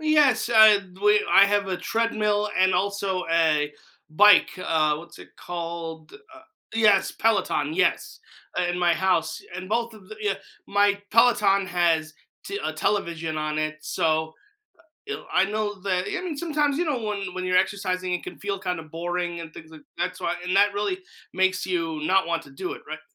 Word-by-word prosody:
Yes, 300 -6 +3
I 220 -2 +8 0.2
w 210 +2 +3
I 195 - +8
have 205 -1 0
a 185 - -1
treadmill 210 -1 0
and 185 0 +4
also 200 -2 -1
a 155 -3 +2 0.4
bike, 210 +4 +6
uh, 155 -4 +1
what's 170 +2 -12
it - - -13
called? 165 -2 -6
The, - - -12 0.2
uh 325 - -15 0.3
yes, 210 -3 +3
Peloton, 160 -9 0
yes, 180 0 0 0.5
in 175 0 -2
my 175 -1 +3
house, 185 -1 0
and 185 0 -7
both 230 +1 -1
of 195 -3 -16
the 215 - -9
yeah, 205 -2 0 0.3
my 205 0 +2
Peloton 205 -4 +4
has 165 -3 0 0.3
t 400 - -4
a - - -1
television 165 -6 -2
on 155 0 -2
it, 155 0 -2
so 160 -2 0 1.0
I 190 - +4
know 210 -1 -3
that 185 -2 0
I 375 - -3
mean, 355 -4 -4
sometimes, 295 -3 0
you 350 - 0
know, 290 -5 -1
when 200 -4 -4
when 185 0 -3
you're 185 0 +2
exercising, 185 -1 -1
it 180 - -3
can - - -8
feel 200 -1 -3
kinda 180 -3 -3
boring 175 +2 -4
and 160 -1 -10
things 160 0 -12
like 160 -1 -14
that's 180 0 -3
why 175 - -2
and 180 +1 -1
that 200 0 +4
really 210 - -2 0.3
makes 185 0 +1
you 165 -4 -2
not 190 +2 +2
want 165 -1 -1
to 140 - -16
do 135 - -5
it, - - -10
right? - - -6
185 Hz, 180 wpm, -24 LUFS, 170-210 Hz, 1.0 s, I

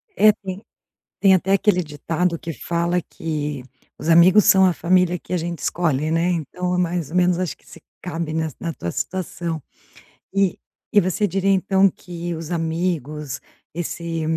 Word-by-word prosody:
É, 215 0 +7
tem 195 -1 -7 0.6
tem 195 -1 +6
até 190 +2 +1
aquele 195 -2 +3
ditado 165 +3 -2
que 165 - -5
fala 170 +4 -1
que: 150 -4 -4 0.4
"Os 160 - -5
amigos 180 +5 +7
são 190 0 +6
a 180 - +3
família 180 0 +2
que - - -11
a - - +2
gente 170 0 -3
escolhe", 155 -3 0
né, 165 +2 +2
então 180 +2 -2
é - - 0
mais 170 -4 -1
ou 180 - -3
menos 180 -1 +3
acho 185 -3 -2
que - - -29
se - - -13 0.2
cabe 165 -3 -3
na 160 0 -1
na 165 -1 -3
tua 85 - -4
situação. 170 - -3 0.7
E 195 -3 +1 0.3
e 205 - +6
você 185 +3 0
diria 195 +2 0
então 195 +1 +4
que 175 -1 -6
os 160 +1 -7
amigos, 160 -4 -2 0.3
esse 170 -1 -3
175 Hz, 170 wpm, -22 LUFS, 160-185 Hz, 0.7 s, É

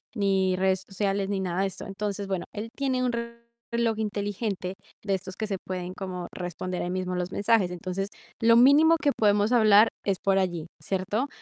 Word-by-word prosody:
ni 195 -3 +2
redes 190 0 +1
sociales 195 0 -1
ni 200 -1 -1
nada 185 0 -1
de 195 - +2
esto. 190 - -8
Entonces, 200 0 -4
bueno, 190 -3 -2
él 215 +2 -5
tiene 260 -2 0
un 250 - +1 0.6
reloj 230 -2 +1
inteligente 205 -2 -3 0.3
de 195 -2 +1
estos 185 0 -7
que 215 - -3
se 195 -2 -2
pueden 185 -1 -4
como 180 -2 -5
responder 180 0 -4
ahí 175 - -3
mismo 185 0 -2
los 180 +1 -2
mensajes. 205 -3 +2
Entonces, 185 +3 -4 0.3
lo 230 0 +5
mínimo 290 +7 +6
que 290 - +3
podemos 210 +1 +3
hablar 215 -2 +6 0.2
es 195 -2 +1
por 195 -1 +3
allí, 175 -4 -1
¿cierto? 200 +7 -1
195 Hz, 185 wpm, -27 LUFS, 185-215 Hz, 0.6 s, mínimo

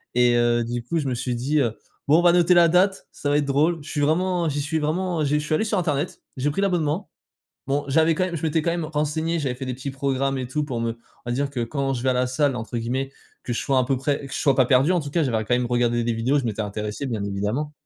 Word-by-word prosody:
Et, 120 -1 +4
heu, 120 0 +2
du 120 +1 -3
coup, 165 +8 -1
je 140 - -2
me 125 - -1
suis 125 +1 -2
dit: 135 +6 0
«Heu, 115 -5 0 0.3
bon 155 +3 +5
on - - +3
va 175 -1 +5
noter 175 0 +5
la 175 -1 +6
date, 185 +3 +2
ça 145 - -4
va 145 - +3
être 150 - +1
drôle», 150 +5 +2
je 155 - -10
suis 145 - -2
vraiment 175 +3 +1
j'y 145 -1 -1
suis 155 +3 -1
vraiment, 165 +2 -1
heu, - - +1
j'ai 150 +1 +1
je 150 - -5
suis 155 - +1
allé - - +1
sur 215 -1 0
internet, 150 -2 -2 0.2
j'ai 145 +3 0
pris 195 - -2
l'abonnement. 175 -2 0 0.6
Bon, 140 +1 0
j'avais 160 +3 +3
quand 185 - +1
même 180 -2 -4
je 150 - -7
m'étais 160 0 +1
quand 170 +2 0
même 170 -2 -2
renseigné. 155 +2 -1
J'avais 135 -5 -1
fait 130 +2 -6
des 130 - -2
petits 130 +2 -6
programmes 135 0 -1
et 130 -2 -4
tout 150 +3 -1
pour 125 -5 -4
me 115 0 -1
on - - -27 0.3
va - - 0
dire 140 +3 0
que 135 -3 -4
quand 135 +3 -1
je 120 - -4
vais 130 - +1
à - - +4
la 125 0 +1
salle 135 +1 +1
entre 115 +1 -5
guillemets 130 +4 -2 0.3
«que 120 - -3
je 120 - -1
sois 135 -2 +1
un 130 - +3
peu 135 +1 0
prêt», 140 +1 -2
que 135 - -11
je - - -2
sois 140 -3 +2
pas 130 -2 +4
perdu, 130 +6 +4
en 180 - +2
tout 145 -2 -6
cas, 165 +3 +1
j'avais 125 -6 0
ra 110 - -1
quand 120 - +1
même 125 0 0
regardé 120 -1 +1
des 120 - 0
vidéos, 120 +6 +1
je - - -7
m'étais 110 -2 -2
intéressé, 105 +5 -4
bien 115 -5 -3
évidemment. 105 +9 -2
140 Hz, 305 wpm, -23 LUFS, 125-155 Hz, 0.6 s, la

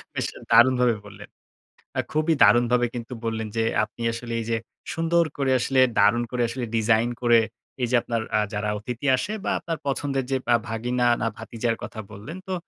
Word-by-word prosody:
বেশ - - -1 0.3
দারুণভাবে 125 0 +5
বললেন। 105 0 -12 0.7
আ - - +5
খুবই 155 +1 +2
দারুণভাবে 120 0 +5
কিন্তু 120 +1 -6
বললেন 110 -1 -2
যে 115 - +2 0.2
আপনি 110 +2 -11
আসলে 115 +1 -6
এই - - -4
যে 115 - +2 0.4
সুন্দর 165 +1 +2
করে 135 -2 +1
আসলে 130 +1 +2 0.2
দারুণ 105 +4 +4
করে 125 -1 -1
আসলে 125 +1 -4
design 110 +1 +3
করে 120 -1 +5 0.4
এই 120 - +1
যে - - -1
আপনার 115 -1 -2
আ - - +4
যারা 105 0 -2
অতিথি 120 +5 -5
আসে 195 - -3
বা - - 0
আপনার 165 -2 -4
পছন্দের 135 -1 -1
যে 135 - +2 0.2
আ - - +7
ভাগিনা 120 +2 0
না 120 - 0
ভাতিজার 115 0 -2
কথা 110 - -6
বললেন 115 - -8
তো 190 - -1
120 Hz, 185 wpm, -24 LUFS, 115-130 Hz, 0.7 s, আ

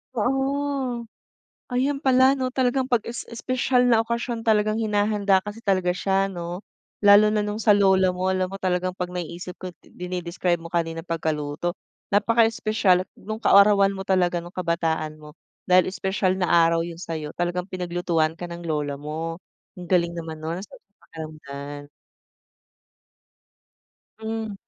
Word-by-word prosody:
Oo. 270 0 -1 0.7
Ayun 275 +3 +1
pala 265 0 +4
'no, 255 -1 -2
talagang 260 0 +1
'pag 240 -4 +1
es 235 - -6
espesyal 250 +1 +1
na 225 -1 +4
okasyon, 235 0 -3
talagang 215 -1 +2
hinahanda 205 -2 +2
kasi 210 +3 -8
talaga 185 -3 +2
siya 195 +2 0
'no. 175 0 -6 0.4
Lalo 205 +1 +7
na 210 - +2
nung 210 0 -3
sa 220 -1 +4
lola 190 -2 +4
mo. 185 +1 -1
Alam 185 0 -1
mo - - -4
talagang 185 0 0
'pag 180 -1 -4
naiisip 180 0 -6
ko, 185 -1 -7
dine-describe 180 -1 -3
mo 170 - -9
kanina 165 -1 -2
pagkaluto, 160 -1 -2 0.4
napakaespesyal 215 -3 +3 0.2
nung 215 +2 -6
kaarawan 200 -1 +6
mo 190 - -6
talaga 180 -2 +2
nung 175 +1 -7
kabataan 165 -3 -1
mo. 150 -1 -13 0.3
Dahil 185 0 +4
espesyal 190 -1 0
na 180 - +1
araw 165 0 +4
yun 170 -1 -7
sa'yo, 160 -3 -5
talagang 175 +1 -2
pinaglutuan 175 -3 -1
ka 175 - -4
ng 170 0 -8
lola 150 -3 -2
mo. 155 +3 -5 0.4
Ang 180 - -9
galing 170 -2 +2
naman 165 -2 -6
nun, 165 +3 -4
sarap - - -13
sa 200 - -50
pakiramdam. 145 -2 -8 2.3
Hmm. 220 -1 -4
185 Hz, 145 wpm, -24 LUFS, 170-215 Hz, 2.3 s, Lalo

